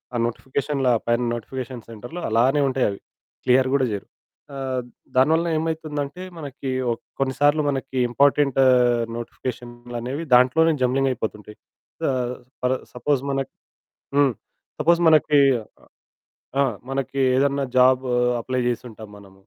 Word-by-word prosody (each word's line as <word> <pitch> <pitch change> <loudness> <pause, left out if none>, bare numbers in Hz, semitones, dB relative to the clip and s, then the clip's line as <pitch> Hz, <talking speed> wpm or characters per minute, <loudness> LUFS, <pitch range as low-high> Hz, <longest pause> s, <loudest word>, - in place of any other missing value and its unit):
ఆ - - +1
నోటిఫికేషన్ల 135 +3 -2 0.2
పైన 120 +1 +2
నోటిఫికేషన్ 125 0 -6
సెంటర్‌లో 120 +10 -8
అలానే 125 +6 +3
ఉంటాయవి. 125 -6 0 0.5
క్లియర్ 130 +1 +4
గూడా 135 -2 +3
జేయరు. 100 -1 -5 0.5
ఆహ్, 130 -2 -2 0.4
దానివలన 160 +6 +3
ఏమైతుందంటే 155 0 -4 0.2
మనకి 140 -2 -5 0.2
ఒక్ 115 - -12 0.2
కొన్నిసార్లు 145 +3 +2
మనకి 135 -1 -3
ఇంపార్టెంట్ 140 +1 +3 0.6
నోటిఫికేషన్లనేవి 120 +3 -6
దాంట్లోనే 160 +7 +4
జంబ్లింగ్ 135 +1 +2
అయిపోతుంటయి. 105 -2 -6 0.5
ఆహ్, 125 -1 -2 0.3
ఫర్ 125 +1 +1 0.2
సపోజ్ 125 +2 0
మనక్ 135 -1 -2 0.7
హ్మ్, 140 -3 +4 0.5
సపోజ్ 170 +3 +4
మనకి 155 -1 +4 1.2
ఆ! - - +5 0.3
మనకి 135 0 -3 0.2
ఏదన్నా 140 +1 +2
జాబ్ 130 +1 +5 0.4
అప్లై 130 +2 -2
జేసుంటాం 115 -3 -5
మనం. 100 -1 -16
130 Hz, 110 wpm, -23 LUFS, 120-140 Hz, 1.2 s, ఆ